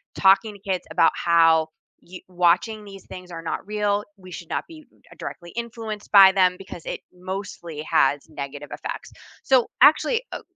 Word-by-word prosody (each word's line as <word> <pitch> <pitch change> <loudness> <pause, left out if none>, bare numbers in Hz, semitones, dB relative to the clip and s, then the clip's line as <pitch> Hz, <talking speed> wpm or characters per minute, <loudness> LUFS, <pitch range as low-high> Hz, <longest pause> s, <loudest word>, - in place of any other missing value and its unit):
talking 195 +2 +3
kids 185 -2 -2
about 165 - +4
how 165 -2 +4 0.3
you 180 +1 -11
"Watching 185 +5 +1
these 195 -2 -12
things 180 -1 -11
are 165 -1 -7
not 165 - -4
real." 210 0 -1
We 185 -1 -14
should 170 -1 -9
not - - -3
be 315 -2 -14
mm - - -28 0.2
directly 175 -1 -8
influenced 225 -3 -6
by 195 -2 +9
them 185 -2 +3
because 190 -3 -10
it - - -4
mostly 180 -4 -7
has 140 +2 +3
negative 145 +1 -7
effects, - - -7 0.3
so, 260 -3 +3
actually, 460 +10 +5
oh - - -6
190 Hz, 165 wpm, -23 LUFS, 170-210 Hz, 0.3 s, by